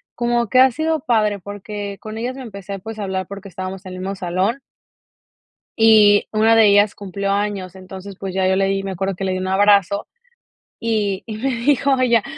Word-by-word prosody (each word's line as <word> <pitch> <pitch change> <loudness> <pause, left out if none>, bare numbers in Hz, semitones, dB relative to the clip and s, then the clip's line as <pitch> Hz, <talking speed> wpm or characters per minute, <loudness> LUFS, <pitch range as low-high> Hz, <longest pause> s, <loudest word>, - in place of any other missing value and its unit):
como 240 0 0
que 255 - +4
ha 260 0 +7
sido 315 +4 -1
padre 215 -5 +1
porque 205 +1 -7
con 215 0 -7
ellas 245 +3 -3
me 270 - -8
empecé, 200 -4 -7
pues, 220 +3 -8
a 210 - -4
hablar 190 -2 -3
porque 200 0 -9
estábamos 185 +2 -7
en 185 - -8
el 185 - -7
mismo 195 +2 -4
salón. 190 +6 -1 1.2
Y 215 -2 +6
una 220 +1 +4
de 225 -1 +6
ellas 205 +1 +4
cumplió 200 0 -4
años, 200 -2 -2
entonces 190 +1 -10
pues 190 -2 -5
ya 190 -1 +2
yo 190 - +2
le 195 0 +2
di 195 0 -1
me 195 - -4
acuerdo 190 +1 -2
que 195 - -6
le 190 - 0
di 185 - -2
un 185 - -3
abrazo 200 0 +3 0.7
y 210 -4 -1
y 220 -2 -6
me 265 +5 -1
dijo 270 +2 +1
ella: 235 -4 +3
205 Hz, 210 wpm, -20 LUFS, 190-225 Hz, 1.2 s, ha